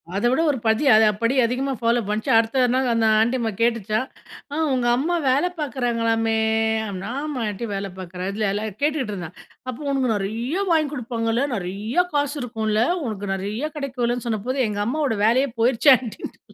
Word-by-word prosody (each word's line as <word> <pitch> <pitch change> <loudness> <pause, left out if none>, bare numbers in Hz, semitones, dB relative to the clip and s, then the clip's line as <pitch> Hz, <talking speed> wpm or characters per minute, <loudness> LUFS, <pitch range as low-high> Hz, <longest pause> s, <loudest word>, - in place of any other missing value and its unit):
அதவிட 240 +7 +2
ஒரு 275 - -3
படி 220 +6 +2
அ - - +7 0.3
படி 230 +3 +2
அதிகமா 260 +3 -1
ஃபாலோ 235 +1 +2
பண்ணுச்சு. 210 +1 -2
அடுத்த 230 +3 +2
நாள் 260 0 +1
அந்த 230 -1 +2
ஆன்ட்டி 235 +4 +2
அம்மா 225 -2 -1
கேட்டுச்சாம். 230 0 0 0.5
அ - - -3 0.2
உங்க 250 -2 0
அம்மா 325 +7 0
வேல 275 +6 +3
பார்க்கிறாங்களாமே. 230 -5 0 0.5
அப்படின்னா 195 0 -5
ஆமா. 300 -4 -4
ஆன்ட்டி 210 +3 -5
வேல 195 0 -3
பார்க்கிறா, 180 0 -6
இதல 210 0 -1
எல்லாம் 215 +2 -2
கேட்டுட்டு 290 -6 0
இருந்தான். 180 -3 -7 0.3
அப்ப 250 - -6
உனக்கு 260 -4 +1
நெறைய 230 - -2
வாங்கி 310 -3 +3
கொடுப்பாங்கள்ல, 235 -1 -1
நெறைய 205 - -1
காசு 290 0 0
இருக்கும்ல, 220 -3 -1 0.2
உனக்கு 205 -3 -4
நிறைய 210 +10 -3
கிடைக்கும்லன்னு 245 -3 -2
சொன்னப்போ, 235 +4 -2
எங்க 205 -1 -3
அம்மாவோட 275 -3 0
வேலையே 255 +5 +3
போயிருச்சு 250 +4 +5
ஆன்ட்டின்னுட்டேன்! 235 -3 -8
235 Hz, 165 wpm, -22 LUFS, 215-260 Hz, 0.5 s, அ